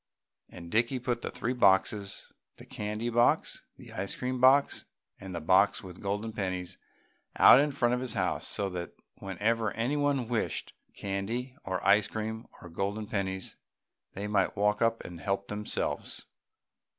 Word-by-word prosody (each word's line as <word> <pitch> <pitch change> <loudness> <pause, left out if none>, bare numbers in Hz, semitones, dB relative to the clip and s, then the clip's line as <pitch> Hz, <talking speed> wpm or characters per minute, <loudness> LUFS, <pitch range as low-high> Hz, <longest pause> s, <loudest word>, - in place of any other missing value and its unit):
And 85 -1 -10
Dickie 120 +4 +2
put 120 -1 -2
the - - -3
three 125 - -2
boxes 100 -3 +2 0.2
the - - -12
candy 105 +3 -3
box, 120 +1 +2 0.2
the - - -12
ice 95 +1 -2
cream 125 0 -3
box 135 +2 +5 0.3
and 95 -3 -7
the - - -2
box 95 +5 +3
with 90 -2 -10
the - - -14
golden 105 +3 -2
pennies 95 -3 -3 0.6
out - - +9
in 145 +1 +3
front 125 -4 +1
of 125 - +1
his 125 -3 -4
house - - 0
so 100 - -1
that 90 -1 -5 0.3
whenever 105 +3 0
anyone 135 +2 0
wished 115 -2 -2 0.2
candy 115 +7 -3
or 95 -1 -3
ice 100 +1 +5
cream 110 +1 -4 0.2
or 90 - -9
golden 100 +5 -2
pennies 95 -3 -3 0.6
they 100 - -5
might 105 -1 +1
walk 105 +1 +2
up 115 0 +2
and 85 -1 -8
help 100 0 -2
themselves. 105 +1 -3
105 Hz, 160 wpm, -30 LUFS, 95-120 Hz, 0.6 s, out